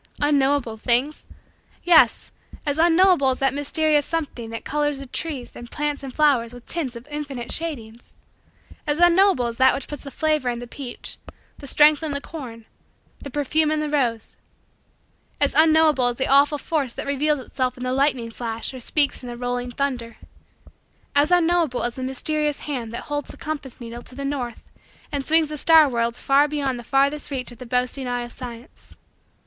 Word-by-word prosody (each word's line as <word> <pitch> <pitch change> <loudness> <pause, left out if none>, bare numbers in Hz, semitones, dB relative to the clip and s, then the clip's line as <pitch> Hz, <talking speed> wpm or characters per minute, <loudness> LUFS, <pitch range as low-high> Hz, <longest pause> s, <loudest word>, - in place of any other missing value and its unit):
Unknowable 280 -5 +1
things? 250 +6 0 0.6
Yes 315 -9 +4 0.3
as 290 +1 -1
unknowable 345 -3 +5
as 255 - 0
that 270 -1 +1
mysterious 295 +1 +1
something 290 -9 -4
that 230 0 -7
colors 295 -1 0
the 275 - -8
trees 275 -1 -4
and 240 0 -9
plants 295 0 -2
and 270 -2 -7
flowers 255 -5 +2
with 245 - -13
tints 280 -8 -4
of 235 +3 -10
infinite 285 -5 -5
shadings 240 -9 -4 0.7
as 295 0 +1
unknowable 350 -5 +4
as 235 -1 -4
that 260 - +5
which 275 - -5
puts 295 - -7
the 280 - -8
flavor 305 -3 0
in 240 - -2
the 245 - -7
peach, 245 +1 -7 0.4
the 280 - -10
strength 300 +2 +5
in 310 -2 -3
the 280 - -2
corn, 250 -8 -9 0.5
the 280 - -8
perfume 295 +3 +1
in 310 0 0
the 300 -1 -2
rose 240 -7 -1 1.0
as - - +2
unknowable 315 -5 +4
as 245 - -1
the 265 - -1
awful 280 +2 +4
force 285 -5 -2
that - - -5
reveals 290 +1 +1
itself 255 0 -3
in 250 - -7
the 255 0 -1
lightning 265 -4 +1
flash 230 +1 -4
or 260 - -7
speaks 285 +3 +1
in 250 - -8
the 240 - -7
rolling 245 0 -3
thunder 245 -3 -3 1.0
as 290 +2 +4
unknowable 340 -6 +2
as 240 - -1
the 260 - -8
mysterious 295 +3 -1
hand 250 -6 -4
that 235 - -6
holds 290 -1 -4
the - - -11
compass 295 -5 -6
needle 235 0 -8
to 250 - -14
the 280 +1 -5
north 255 -5 -4 0.5
and 285 -1 -2
swings 320 +1 +3
the 300 -1 -5
star 320 -1 +6
worlds 235 -2 -1
far 280 +1 +4
beyond 280 -4 -2
the - - -9
farthest 280 +4 +1
reach 260 -3 -4
of 240 - -14
the 250 - -9
boasting 250 +2 -1
eye 245 0 -2
of 240 - -9
Science. 240 -1 -10
275 Hz, 185 wpm, -23 LUFS, 245-300 Hz, 1.0 s, star